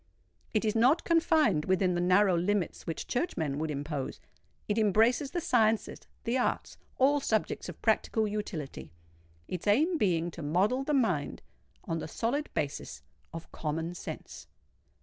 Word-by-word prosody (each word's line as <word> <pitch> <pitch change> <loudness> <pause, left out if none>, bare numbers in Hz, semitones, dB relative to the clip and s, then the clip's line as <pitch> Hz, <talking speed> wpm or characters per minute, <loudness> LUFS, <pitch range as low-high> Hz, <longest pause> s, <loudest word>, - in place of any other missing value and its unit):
It 215 0 0
is 215 - +1
not 255 +8 +4
confined 315 - +3
within 185 -1 +2
the 175 - 0
narrow 185 +1 +4
limits 185 +2 -1
which 165 - -4
churchmen 160 - -2
would 160 0 -2
impose: 145 -1 -4 0.5
it 210 +2 +1
embraces 225 - +3
the 345 - -2
sciences—the 230 -1 0
arts—all 275 +3 0
subjects 220 -5 -1
of - - -9
practical 220 -1 +2
utility,—its 85 - -7
aim 310 - +3
being 175 -5 +1
to 170 - -9
model 190 - +1
the 295 +1 0
mind 180 - 0 0.4
on 165 0 -3
the - - -5
solid 260 - -2
basis 140 - -3 0.3
of 165 0 -9
Common 165 +2 -3
Sense. 175 - -8
195 Hz, 135 wpm, -30 LUFS, 160-240 Hz, 0.5 s, not